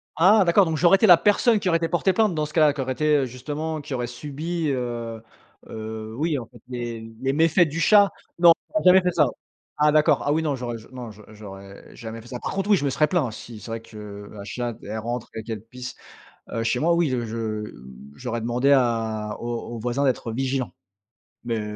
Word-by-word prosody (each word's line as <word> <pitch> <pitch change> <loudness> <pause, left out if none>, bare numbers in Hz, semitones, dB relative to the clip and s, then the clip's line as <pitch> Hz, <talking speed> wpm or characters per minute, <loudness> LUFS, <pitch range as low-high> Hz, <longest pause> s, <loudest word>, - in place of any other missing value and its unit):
Ah 195 +5 +6
d'accord, 180 +3 +5
donc 160 -1 -1
j'aurais 175 +4 +6
été 195 - +3
la 175 -3 +9
personne 210 +2 +3
qui 195 - -3
aurait 165 - +4
été 165 0 -2
portée 185 +2 +2
plainte 215 -2 +2
dans 155 -1 -1
ce 150 - -10
cas-là? 155 -3 +4
Qui 140 - -4
aurait 130 0 -2
été 150 -1 +2
justement 150 +5 -4
qui 145 -1 -7
aurait 125 -1 -2
subi, 150 +6 -4
heu 120 -4 -3 0.5
heu, 110 0 -6
oui, 155 +1 0
en 115 - -7
fait 120 -1 -17
les 120 -2 -5 0.2
les 135 +1 0
méfaits 165 +2 +4
du 150 +3 -4
chat. 200 +4 +6 0.3
Non, 170 -1 +8 0.2
j'aurais 315 - -1
jamais 185 +1 +8
fait 180 0 +1
ça. 150 -5 +3 0.5
Ah 150 0 +5
d'accord, 155 0 +3
ah 145 - +2
oui 160 - +1
non, 150 -3 0
j'aurais 120 -2 -4
je 110 - -16
non, 125 -3 -8
je 105 +1 -15
j'aurais 100 -2 -12
jamais 115 0 -7
fait 120 - -15
ça. 125 -1 -6
Par - - -4
contre, 195 +1 -2
oui, 200 - +6
je 145 - -2
me 140 - +2
serais 150 +3 +2
plaint. 150 -8 0
Si 110 0 -10
c'est 105 - -10
vrai 115 0 -4
que 105 -2 -10
la 100 -1 -9
chatte, 120 +2 -4
elle 105 +2 -5
rentre 120 +1 -4
et 110 - -5
qu'elle 110 -3 -5
pisse, 125 +2 -9 0.6
heu, 115 - -1
chez 120 +2 0
moi, 170 +5 +3
oui, 170 -4 +2
je 120 -2 -1
je 115 +1 -5
mmh, 70 - -6
j'aurais 120 - -4
demandé 120 +4 +1
à 115 -5 +1
aux 120 0 -4
aux - - -5
voisins 125 +4 -1
d'être 125 -3 0
vigilants, 130 +1 -2 0.7
mais 110 -3 -3
125 Hz, 230 wpm, -24 LUFS, 115-160 Hz, 0.7 s, la